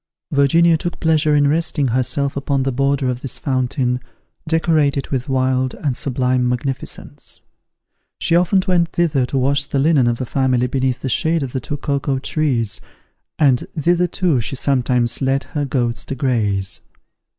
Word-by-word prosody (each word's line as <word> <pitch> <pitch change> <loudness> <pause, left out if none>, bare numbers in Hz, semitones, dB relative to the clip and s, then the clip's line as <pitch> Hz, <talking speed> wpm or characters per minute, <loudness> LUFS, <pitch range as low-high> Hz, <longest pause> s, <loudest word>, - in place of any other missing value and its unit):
Virginia 160 +4 +4
took 175 +1 -4
pleasure 155 -2 +2
in 145 -1 +4
resting 150 -2 0
herself 130 +3 0
upon 140 -1 -1
the 135 - 0
border 140 +1 0
of 125 0 -2
this 135 - -4
fountain, 130 -2 -1 0.5
decorated 155 -4 +1
with 130 -1 -3
wild 130 -1 0
and 140 -4 -2
sublime 125 -1 0
magnificence. 125 +2 -5 0.8
She 165 - +1
often 180 +2 +3
went 175 -2 +2
thither 150 -7 +1
to 135 - -2
wash 140 +2 +1
the - - -3
linen 140 -3 +3
of 120 -1 +1
the 130 - -3
family 130 -1 +1
beneath 130 0 -1
the - - -3
shade 160 +4 +1
of 130 - -6
the 130 - -1
two 145 - -4
cocoa 140 -1 -1
trees, 130 -7 -1 0.6
and 135 -5 +2
thither 175 +3 +2
too 170 -9 0
she 135 +4 -4
sometimes 125 -2 0
led 135 +1 +1
her 145 -2 -3
goats 120 -5 -1
to 135 - -4
graze. 105 -8 -1
135 Hz, 160 wpm, -19 LUFS, 125-150 Hz, 0.8 s, Virginia